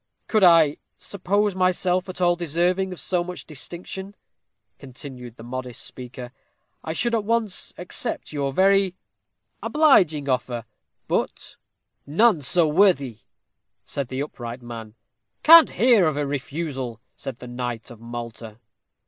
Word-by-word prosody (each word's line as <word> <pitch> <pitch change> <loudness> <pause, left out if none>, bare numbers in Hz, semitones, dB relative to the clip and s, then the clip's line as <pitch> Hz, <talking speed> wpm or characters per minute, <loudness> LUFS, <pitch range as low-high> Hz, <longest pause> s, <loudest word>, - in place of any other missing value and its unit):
"Could 215 -3 +2
I 165 -4 +6 0.2
suppose 200 +1 0
myself 185 0 +1
at 185 - -7
all 175 -1 +3
deserving 175 +3 0
of 180 - -7
so 180 -2 0
much 180 0 -7
distinction," 180 +6 -7 0.6
continued 125 -3 -10
the 115 - -12
modest 125 0 -5
speaker, 125 -1 -7 0.5
"I 160 - -4
should 235 +7 0
at 225 -2 +1
once 220 -3 0
accept 180 -3 -4
your 140 -2 -1
very 195 +3 +3 0.7
obliging 185 - +3
offer; 125 -3 -1 0.4
but - - -2 0.3
" - - -53 0.2
"None 215 -10 +5
so 160 +5 +3
worthy," 150 - +3 0.7
said 140 -3 -4
the 130 +2 -4
upright 120 -4 -7
man. 115 -2 -9 0.5
"Can't 330 +1 +9
hear 230 -7 +4
of 155 -2 -1
a 145 - 0
refusal," 140 -4 -4 0.2
said 130 -3 -7
the 125 - -10
knight 120 -1 -5
of 120 - -12
Malta. 115 -2 -8
155 Hz, 135 wpm, -23 LUFS, 125-185 Hz, 0.7 s, Can't